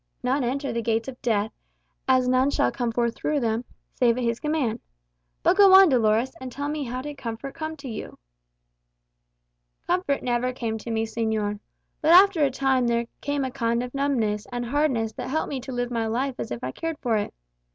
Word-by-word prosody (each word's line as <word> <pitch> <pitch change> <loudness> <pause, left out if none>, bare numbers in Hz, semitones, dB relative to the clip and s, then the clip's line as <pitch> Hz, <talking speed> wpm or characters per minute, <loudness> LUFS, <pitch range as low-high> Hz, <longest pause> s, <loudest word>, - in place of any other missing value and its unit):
"None 260 +2 +1
enter 265 +1 -2
the 235 - -1
gates 225 +1 0
of 255 -2 -8
death, 220 -2 0 0.6
as 255 -1 +4
none 255 +2 +3
shall 125 - +1
come 240 - -2
forth 235 0 0
through 300 -1 -1
them, 230 -1 -1 0.3
save 240 -2 +2
at 250 - -1
his 235 0 0
command. 300 -7 -1 0.6
But 375 - +4
go 395 -2 +8
on, 385 -2 +9
Dolores, 235 0 +2
and 260 -1 -6
tell 285 +3 -4
me 300 -1 -3
how 250 +1 -4
did 295 -1 -7
comfort 230 +3 -5
come 315 -1 -5
to 280 -2 -9
you?" 220 -3 -7 1.7
"Comfort 350 -5 0
never 250 +1 0
came 225 -3 -3
to 235 - -8
me, 225 0 0
señor. 220 -2 -2 0.4
But 315 +2 +5
after 370 -3 +7
a 280 - +4
time 265 -1 +1
there 235 0 +1 0.2
came 285 -1 -1
a 260 - -4
kind 235 -2 0
of 250 - -7
numbness 235 -7 0
and 245 0 -3
hardness 245 -4 0
that - - -6
helped 315 +4 -1
me 275 - -2
to 260 +1 -8
live 245 -1 -2
my 230 -2 -1
life 255 +5 -1
as - - -4
if 120 -1 -6
I 130 - -2
cared 325 - -4
for 235 -6 0
it. 205 - -2
250 Hz, 205 wpm, -25 LUFS, 230-280 Hz, 1.7 s, on